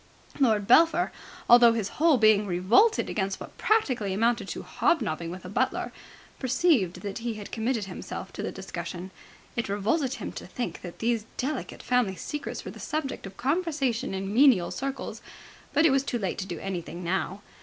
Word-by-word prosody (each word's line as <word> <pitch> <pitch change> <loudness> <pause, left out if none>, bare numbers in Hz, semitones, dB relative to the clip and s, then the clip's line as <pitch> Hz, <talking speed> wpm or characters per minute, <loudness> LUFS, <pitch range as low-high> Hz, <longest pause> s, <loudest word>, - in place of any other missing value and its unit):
Lord 220 -7 +3
Belpher, 330 - +5 0.4
although 240 -1 +8
his 215 -4 -2
whole 315 -3 +5
being 215 -2 +5
revolted 195 - +3
against 195 -2 -2
what - - -10
practically 255 - +1
amounted 230 +3 +1
to - - -5
hobnobbing 165 - 0
with 180 +1 -8
a - - -5
butler, 240 +7 -1 0.5
perceived 250 - +2
that 200 +1 -5
he 230 -1 -3
had 210 -1 -8
committed 225 -1 -1
himself 190 0 -7
to - - -5
the - - -3
discussion. 180 -1 -6 0.4
It 235 -4 -2
revolted 245 +8 0
him - - -5
to - - -8
think 235 -9 -4
that 175 -2 -8
these 225 -1 0
delicate 270 +2 -3
family 245 -6 +1
secrets 295 +9 -5
were - - -5
the - - -12
subject 290 -9 -3
of 195 - -13
conversation 275 - 0
in 195 +1 -3
menial 240 -8 +5
circles, 275 0 -4 0.5
but 300 +3 +3
it 320 - +6
was 270 0 +3
too 250 - -2
late 195 -5 -3
to 190 - -4
do 175 -3 -5
anything 180 -1 -5
now. 190 +3 -2
225 Hz, 175 wpm, -27 LUFS, 190-270 Hz, 0.5 s, although